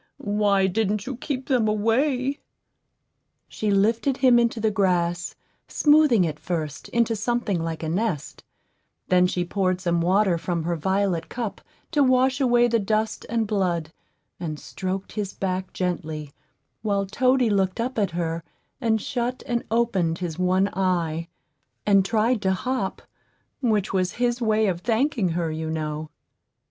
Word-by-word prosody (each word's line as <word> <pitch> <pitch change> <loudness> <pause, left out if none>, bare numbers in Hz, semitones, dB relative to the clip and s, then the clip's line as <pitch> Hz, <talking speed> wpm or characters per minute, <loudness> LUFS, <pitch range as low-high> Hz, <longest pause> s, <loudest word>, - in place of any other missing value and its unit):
Why 200 -2 +4
didn't 205 +1 0
you 265 - -4
keep 260 +1 -4
them 245 -5 +2
away?" 255 +6 +1 1.1
She 215 - -3
lifted 225 +7 +2
him 255 -2 +5
into 235 -1 +1
the 220 0 +1
grass, 180 -4 0 0.3
smoothing 295 -9 +4
it 155 -3 -2
first 155 -5 -4
into 235 -1 +1
something 220 -4 -1
like 165 0 -4
a - - -2
nest; 175 -3 -2 0.7
then 180 0 +5
she 180 -1 -1
poured 185 0 0
some 170 -2 0
water 185 0 +2
from 170 -1 -2
her 170 +1 -1
violet 190 +1 0
cup 235 -4 -4 0.3
to 300 -3 +2
wash 260 +1 +3
away 240 -2 +4
the 230 -1 +2
dust 215 +2 -1
and 230 -1 +1
blood, 175 -6 -1 0.5
and 155 -4 -4
stroked 185 +8 -5
his 205 -3 -4
back 185 -1 -2
gently, 160 -5 -3 0.5
while 200 -2 0
Toady 255 +3 +2
looked 190 -1 +1
up 245 +1 -1
at 200 - +2
her, 165 -1 -3 0.4
and 225 -2 +2
shut 245 +2 -3
and 240 -1 -1
opened 195 -8 +1
his 175 -2 -5
one 185 +2 +3
eye, 170 -4 0 0.6
and 195 -2 +5
tried 220 +3 +1
to 190 -1 +2
hop, 230 0 -2 0.6
which 215 -6 +1
was 185 -2 +1
his 245 0 0
way 220 -1 +2
of 180 -4 -1
thanking 230 -2 +1
her, 165 -1 -1
you 160 0 -4
know. 155 -1 -3
200 Hz, 150 wpm, -24 LUFS, 175-235 Hz, 1.1 s, him